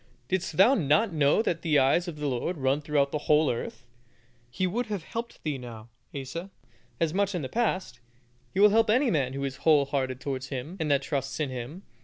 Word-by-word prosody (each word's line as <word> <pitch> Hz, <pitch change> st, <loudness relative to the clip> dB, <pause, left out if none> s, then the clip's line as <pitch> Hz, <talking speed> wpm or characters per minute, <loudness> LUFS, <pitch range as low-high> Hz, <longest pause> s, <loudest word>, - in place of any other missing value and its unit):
Didst 180 Hz, -4 st, -2 dB
thou 200 Hz, +8 st, +7 dB
not 165 Hz, -, +2 dB
know 150 Hz, +7 st, +3 dB
that 165 Hz, -6 st, -1 dB
the 155 Hz, -3 st, +2 dB
eyes 140 Hz, +7 st, +3 dB
of 170 Hz, -, -5 dB
the 150 Hz, 0 st, -5 dB
Lord 140 Hz, +6 st, -2 dB
run 135 Hz, +1 st, +1 dB
throughout 145 Hz, -2 st, +1 dB
the 150 Hz, -, -1 dB
whole 150 Hz, 0 st, +5 dB
earth?" 115 Hz, 0 st, -6 dB, 0.6 s
He 155 Hz, +10 st, -1 dB
would 230 Hz, +7 st, -1 dB
have 205 Hz, -6 st, -4 dB
helped 230 Hz, +6 st, -6 dB
thee 150 Hz, -4 st, -2 dB
now, 115 Hz, -2 st, -10 dB, 0.3 s
Asa, 165 Hz, +8 st, -6 dB, 0.5 s
as 165 Hz, -2 st, +1 dB
much 200 Hz, +1 st, +1 dB
as 200 Hz, -, -5 dB
in 175 Hz, -, -2 dB
the 130 Hz, -, -4 dB
past. 190 Hz, -, -1 dB, 0.5 s
He 190 Hz, -, -3 dB
will 205 Hz, 0 st, +7 dB
help 225 Hz, +1 st, +3 dB
any 250 Hz, +4 st, +3 dB
man 135 Hz, -5 st, 0 dB
who 140 Hz, 0 st, -4 dB
is 135 Hz, -1 st, -3 dB
whole 150 Hz, -2 st, +4 dB
hearted 130 Hz, -2 st, -2 dB
towards 135 Hz, -3 st, -4 dB
Him 140 Hz, +7 st, -6 dB
that 145 Hz, -5 st, +1 dB
trusts 135 Hz, -1 st, -3 dB
in 145 Hz, -4 st, -1 dB
Him. 130 Hz, +9 st, -7 dB
150 Hz, 215 wpm, -27 LUFS, 135-185 Hz, 0.6 s, thou